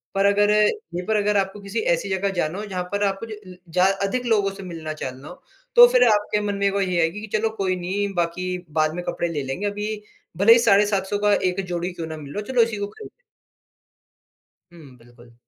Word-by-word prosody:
पर 195 - +2
अगर 205 +1 +4
यहीं 210 - 0
पर 220 - 0
अगर 205 0 +1
आपको 195 +1 -1
किसी 200 +3 -4
ऐसी 170 +4 -3
जगह 190 +1 0
जाना 175 -1 -2
हो 210 - -5
जहाँ 185 -3 -4
पर 200 0 -1
आपको 195 +2 -1
ज - - -10
अ, 200 -4 -10
जहाँ 180 +3 +3 0.2
अधिक 250 +4 -2
लोगों 205 -4 +2
से 195 -1 -10
मिलना-चालना 155 -5 -7
हो, 175 - -12 0.3
तो 485 0 +10
फिर - - +4
आपके 210 0 +2
मन 200 - -1
में 200 0 +1
वही 190 -3 0
आएगी 165 +6 0
कि 220 - -7
चलो 220 +1 0
कोई 185 -2 0
नहीं, 195 +3 -2
बाकी 180 +1 -2
बाद 155 0 +1
में 175 - -4
कपड़े 170 - -1
ले 150 -4 -3
लेंगे, 135 +10 -4
अभी 210 +1 -3 0.4
भले 215 +4 +7
ही 235 - +5
साढ़े 205 -2 +5
700 200 0 -1
का 205 - +5 0.2
1 180 +2 -3
जोड़ी 175 +1 -3
क्यों 165 -2 -6
ना 160 -1 -6
मिल 145 -2 -9
रहा - - -3
हो, 235 - -7
चलो 245 - +5
इसी 225 -2 +1
को 205 0 -3
खरीद 435 - -11 1.6
हुँ, 145 -7 -15
बिल्कुल। 120 0 -19
195 Hz, 225 wpm, -23 LUFS, 175-210 Hz, 1.6 s, तो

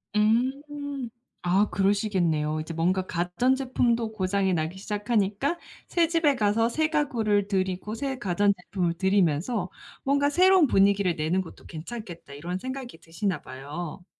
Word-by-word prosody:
음. 270 +4 0 0.3
아 190 +4 +2
그러시겠네요. 185 -7 +1
이제 160 +2 -5
뭔가 185 +3 +1
가전제품도 235 +5 0
고장이 190 -1 0
나기 160 +4 -2
시작하니까 210 - -1 0.3
새 335 -2 +2
집에 325 -4 +2
가서 225 +1 +2
새 315 +5 0
가구를 230 -10 +1
들이고 190 +1 -1
새 270 +1 -3
가전제품을 185 -3 0
들이면서 190 +1 +1 0.3
'뭔가 285 +1 +2
새로운 370 0 +6
분위기를 195 -3 +3
내는 160 +5 0
것도 175 - -12
괜찮겠다.' 175 -2 -8
이런 170 +6 -4
생각이 260 -2 -6
드시나 170 0 -3
봐요. 150 +7 -7
200 Hz, 320 characters per minute, -26 LUFS, 180-250 Hz, 0.3 s, 새로운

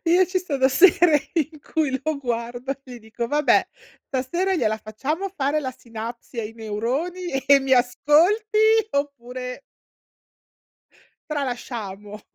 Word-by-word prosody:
Io 355 +3 +5
ci 370 +1 0
sono 280 -7 +1
sere 325 0 +5
in 310 -2 -1
cui 290 -5 -1
lo 310 0 -1
guardo 245 0 -3
e 255 -2 -11
gli - - -9
dico: 225 +1 -5
"Vabbè, 295 +3 +3 0.4
stasera 345 +9 -1
gliela 220 -10 +1
facciamo 275 - -3
fare 290 -1 0
la 260 - -3
sinapsi 235 +1 -8
ai 215 0 -6
neuroni 250 - -3 0.2
e 280 -1 +7
mi 270 0 -1
ascolti 315 - +3 0.3
oppure" 255 -2 -4 1.7
"tralasciamo?" 220 -7 -5
270 Hz, 120 wpm, -23 LUFS, 235-315 Hz, 1.7 s, e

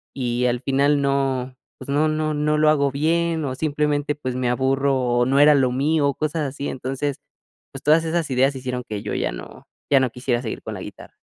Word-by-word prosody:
y 125 -2 -1
al 120 0 0
final 140 +2 +2
no, 135 -2 -1 0.2
pues, 130 - -10
no 145 +3 +2
no 155 0 -1
no 150 +1 +1
lo 155 0 +5
hago 140 -2 +2
bien 160 +2 0
o 130 -2 -3
simplemente, 150 0 0
pues, 130 -4 -4
me 125 -1 0
aburro 135 +2 +1
o 120 -1 +1
no 135 +2 +2
era 150 +1 +7
lo 130 -3 +2
mío", 140 +2 +1
cosas 155 0 -2
así. 140 +1 -5
Entonces, 135 +2 -3 0.5
pues, - - -9
todas 160 +2 +4
esas 165 -1 -1
ideas 135 +2 +2
hicieron 125 -1 -4
que 105 -1 -5
yo 105 - -4
ya - - -1
no - - -10 0.2
ya 140 - +6
no 130 -1 +1
quisiera 125 -1 -1
seguir 115 -4 -6
con - - -6
la - - -7
guitarra. - - -11
140 Hz, 210 wpm, -22 LUFS, 130-150 Hz, 0.5 s, era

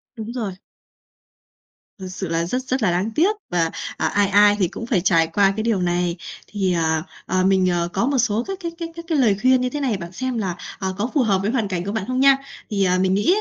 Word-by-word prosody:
Đúng 225 0 -6
rồi. 220 -6 -3 1.5
Thật 190 - -6
sự 190 +1 -5
là 165 0 0
rất 250 +9 -2
rất 260 -1 -1
là 185 - +3
đáng 185 +6 -1
tiếc 385 +7 +3 0.2
và, 165 -2 +1 0.3
ờ, - - 0
ai 205 -1 +2
ai 205 +1 +6
thì 185 - +3
cũng 230 - -7
phải 225 -7 +1
trải 165 -2 +3
qua 195 +4 +2
cái 220 - -1
điều 220 -5 +1
này. 175 -1 0 0.3
Thì, 195 -3 -1
ờ, 160 -2 +1 0.2
ờ, 185 0 +1
mình, 190 -1 +3
ờ, 175 -1 0
có 195 +5 +1
một 275 0 +1
số 230 -1 +1
các 390 0 -4
cái 340 -3 -4
cái 335 -1 -4
cái 335 - -7
cái 320 -3 +1
lời 215 -7 +3
khuyên 255 0 +4
như 250 - 0
thế 295 - -4
này, 255 -7 0
bạn 170 -1 -8
xem 255 +3 -3
là, 185 -5 -2 0.2
ờ, 190 -1 -2
có 215 +4 -1
phù 290 - +3
hợp 200 -6 +2
với 205 +3 0
hoàn 230 -5 0
cảnh 180 -3 -3
của 200 - -2
bạn 220 -2 -2
không 255 0 -1
nha. 275 0 +6 0.3
Thì, 200 -3 0
à, 180 0 +2
mình 185 0 +2
nghĩ 205 - +3
205 Hz, 260 wpm, -21 LUFS, 185-250 Hz, 1.5 s, ai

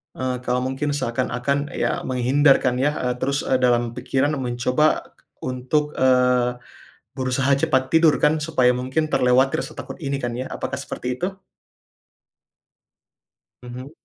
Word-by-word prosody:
Eee, 125 -1 -3
kalau 125 0 0
mungkin 135 +3 -2
seakan-akan 135 +1 -1
ya - - -1
menghindar 135 +3 +3
kan 125 -1 0
ya, 135 +4 +1
eee, 125 0 -1
terus, 140 +3 -2
eee, 130 - +2
dalam 120 -1 +2
pikiran 135 +4 0
mencoba 125 +3 0 0.3
untuk, 130 +4 -2
eee, 125 -1 +2 0.5
berusaha 130 +1 -1
cepat 130 -1 +1
tidur 160 -1 +5
kan 150 +1 +4
supaya 150 -5 +2
mungkin 130 +5 -1
terlewati 130 +4 +3
rasa - - -5
takut - - -8
ini 140 -4 -2
kan 120 - -1
ya 130 - -4
apakah - - -4
seperti 125 0 -5
itu? 190 +2 -2 2.3
Hmm. 125 +3 -8
130 Hz, 135 wpm, -22 LUFS, 125-145 Hz, 2.3 s, tidur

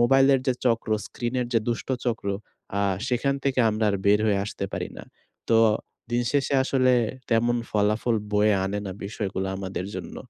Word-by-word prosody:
মোবাইলের 135 +2 +5
যে 130 - +4
চক্র, 115 -1 +1 0.2
স্ক্রিনের 125 0 -2
যে 115 - +5
দুষ্ট 120 - -2 0.2
চক্র 110 -4 -1 0.5
আ - - +2 0.3
সেখান 135 +3 +1
থেকে 135 -2 +2
আমরা 110 +1 -1
আর 100 - 0
বের 105 +1 +5
হয়ে 100 -2 +2
আসতে 105 - -5
পারি - - -3
না। - - -9 0.5
তো 115 - +6 0.5
দিনশেষে 135 +4 +1
আসলে 130 -1 +3 0.4
তেমন 120 +1 +3
ফলাফল 105 +3 +1 0.2
বয়ে 105 0 +4
আনে 100 +2 -2
না 95 - -4
বিষয়গুলো 95 -2 -3
আমাদের 95 -1 -4
জন্য। - - -6
115 Hz, 165 wpm, -25 LUFS, 105-125 Hz, 0.5 s, তো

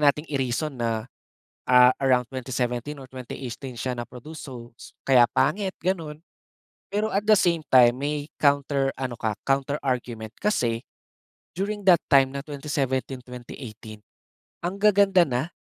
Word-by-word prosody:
nating 150 +1 +3
i-reason 135 +3 -1
na, 115 -3 -2 0.6
ah, 125 0 +7
around 125 -2 +3
2017 130 +1 -3
or 130 - -11
2018 130 0 -7
siya 125 +1 -3
naproduce 125 +6 -8
so 120 -3 -9
s - - -13
kaya 125 -3 +6
pangit, 190 +3 +1
gano'n. 165 -5 -2 0.7
Pero 210 +2 0
at 200 - 0
the 215 - +7
same 175 -4 +2
time, 125 -1 +6
may 145 +1 -3
counter 140 -1 +2
ano 130 -2 -4
ka, 110 -1 -1
counter 135 +1 0
argument. 120 -4 -3
Kasi 120 - 0 0.7
during 205 +3 -3
that 180 -3 +6
time 135 -2 +6
na 140 - -3
2017- 135 -3 -2
2018 120 -3 -10 0.6
ang 185 +3 -3
gaganda 200 -3 +5
na 130 +6 -2
135 Hz, 140 wpm, -25 LUFS, 125-155 Hz, 0.7 s, ah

